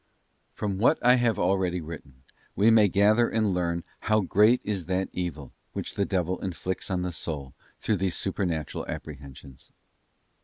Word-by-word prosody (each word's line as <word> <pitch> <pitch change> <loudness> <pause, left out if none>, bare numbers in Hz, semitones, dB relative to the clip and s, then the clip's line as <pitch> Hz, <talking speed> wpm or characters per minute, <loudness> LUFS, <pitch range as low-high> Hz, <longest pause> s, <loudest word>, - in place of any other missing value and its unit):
From 100 -3 -3
what 125 +8 +4
I 125 - +8
have 120 -4 +1
already 90 -1 +1
written, 75 -5 -10 0.3
we 105 +4 +5
may 110 -2 +6
gather 105 +5 +3
andlearn 90 -6 0 0.2
how 110 0 +2
great 105 +6 +4
is 95 -6 -3
that 95 0 -1
evil 80 -7 -4 0.2
which - - -4
the 100 - 0
devil 90 -2 -1
inflicts 95 0 -4
on 90 -1 -1
the 90 - -2
soul 75 -5 -5 0.2
through 105 - 0
these 95 -1 -1
Supernatural 90 -6 -2
Apprehensions. 70 -3 -9
95 Hz, 150 wpm, -27 LUFS, 85-105 Hz, 0.3 s, I